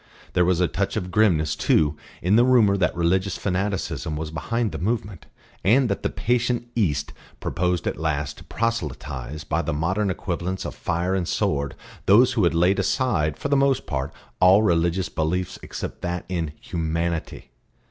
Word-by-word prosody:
There 90 -1 +3
was 90 -1 +2
a 90 - +3
touch - - -2
of 90 0 -3
grimness 80 -7 +3
too 75 0 +2 0.3
in 95 +4 +3
the 120 - +6
rumour 120 -6 +5
that 95 -2 +1
religious 90 +2 +1
fanaticism 95 -5 -2
was 80 0 -4
behind 115 +6 -1
the - - -5
movement, 100 -3 -3 0.4
and 120 +5 +4
that 100 - -1
the - - 0
patient 120 0 0
East 75 -11 0 0.3
proposed 90 -1 -1
at - - -2
last 75 -3 -2
to - - -12
proselytise 75 - -3
by - - 0
the - - -2
modern 95 +7 0
equivalents 95 0 -3
of - - -4
fire 85 +3 -1
and 90 -3 0
sword 70 -1 0 0.3
those 120 +6 +6
who 110 -6 +2
had 85 - +2
laid 90 +4 +3
aside 95 - +1
for 145 - -3
the 140 - +3
most 135 -1 +2
part 65 0 -3 0.3
all 95 +4 +6
religious 85 0 +2
beliefs 90 +3 -2
except - - -6
that 90 0 -3
in 85 -5 -2
Humanity. 85 -3 -3
90 Hz, 170 wpm, -24 LUFS, 80-105 Hz, 0.4 s, the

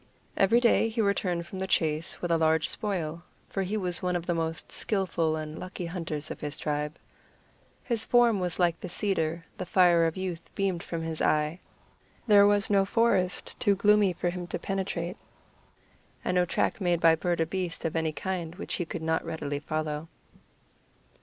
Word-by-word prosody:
Every 200 +5 +4
day 235 -1 +4
he 225 +1 -5
returned 185 -5 0
from 190 +2 -8
the 190 - -2
chase 160 -2 0
with 175 - -1
a 165 - +4
large 160 0 +3
spoil, 170 -6 -1 0.3
for 195 - -3
he 195 +3 -1
was 180 -3 -2
one 180 -1 0
of 175 -1 -2
the 175 - 0
most 165 -1 -3
skilful 175 -6 +1
and 155 0 -6
lucky 185 -1 -6
hunters 165 -3 -4
of - - -6
his 145 0 -3
tribe. 150 +1 -2 0.9
His 235 -3 0
form 240 -4 +4
was 180 -2 -1
like 175 -2 +2
the - - -6
cedar; 165 -4 -1
the 185 - -3
fire 175 -3 +5
of 165 - -4
youth 180 -3 -3
beamed 190 -4 0
from 165 -2 -4
his 160 -1 -4
eye; 150 +3 +1 0.7
there 205 -3 +7
was 205 0 +3
no 200 -1 +4
forest 195 -3 +1
too 200 - +3
gloomy 210 0 +4
for 175 0 -2
him 175 -1 -6
to - - -3
penetrate, 190 -2 -3 1.1
and - - 0
no 180 0 +3
track 180 - -1
made 175 -2 +2
by 165 -1 +6
bird 170 +1 -1
or 165 - +3
beast 175 -1 -3
of 165 - -2
any 160 -1 +1
kind 170 +2 -4
which 200 - -5
he 175 - -1
could 165 0 -6
not 160 0 0
readily 160 -3 -3
follow. 155 +1 -3
175 Hz, 185 wpm, -28 LUFS, 160-195 Hz, 1.1 s, there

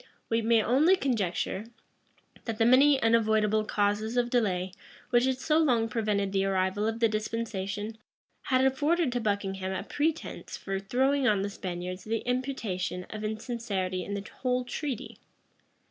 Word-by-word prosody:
We 230 0 +2
may 225 0 +3
only 295 - +4
conjecture, 215 - -1 0.8
that 225 -2 -3
the 225 - +3
many 270 +3 +6
unavoidable 220 -2 +3
causes 210 +3 0
of 240 0 +1
delay 190 -6 +1 0.4
which 240 0 +4
had 260 -1 +1
so 305 +4 +2
long 245 -8 +3
prevented 210 -3 0
the 195 0 +1
arrival 190 +2 0
of 225 +1 -2
the 230 - +5
dispensation, 215 -1 -3 0.5
had 260 -1 +3
afforded 290 +3 +2
to 245 0 -1
Buckingham 195 -3 -1
a 190 +1 -3
pretence 305 +8 -3
for 195 -1 -3
throwing 260 +7 +1
on 205 -3 +3
the 200 - -3
Spaniards 180 -1 -5
the 225 +1 -1
imputation 230 -9 -2
of 215 0 -6
insincerity 215 -5 -3
in 200 +3 -4
the 200 +1 -5
whole 250 -1 +1
treaty. 265 -2 -5
220 Hz, 150 wpm, -29 LUFS, 200-250 Hz, 0.8 s, many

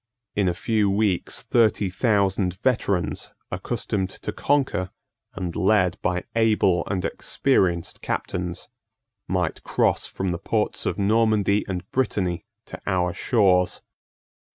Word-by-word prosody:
In 100 -3 +2
a 85 - -2
few 105 +1 +1
weeks 100 -2 +1
thirty 110 -4 +3
thousand 95 -3 +1
veterans, 100 -8 0 0.2
accustomed 95 -3 -2
to 105 - -6
conquer, 105 -8 0 0.5
and 90 -3 -4
led 95 -1 +2
by 90 0 0
able 105 -6 +3
and 95 -2 -1
experienced 90 -11 0
captains, 90 -1 -3 0.6
might 90 -3 -1
cross - - +1
from 95 -1 -3
the 85 - -3
ports 105 +2 -1
of - - -1
Normandy 105 -1 +2
and 90 -2 -4
Brittany 95 -9 0 0.2
to - - -10
our 90 -3 +1
shores. 95 -7 +2
95 Hz, 120 wpm, -24 LUFS, 90-110 Hz, 0.6 s, thirty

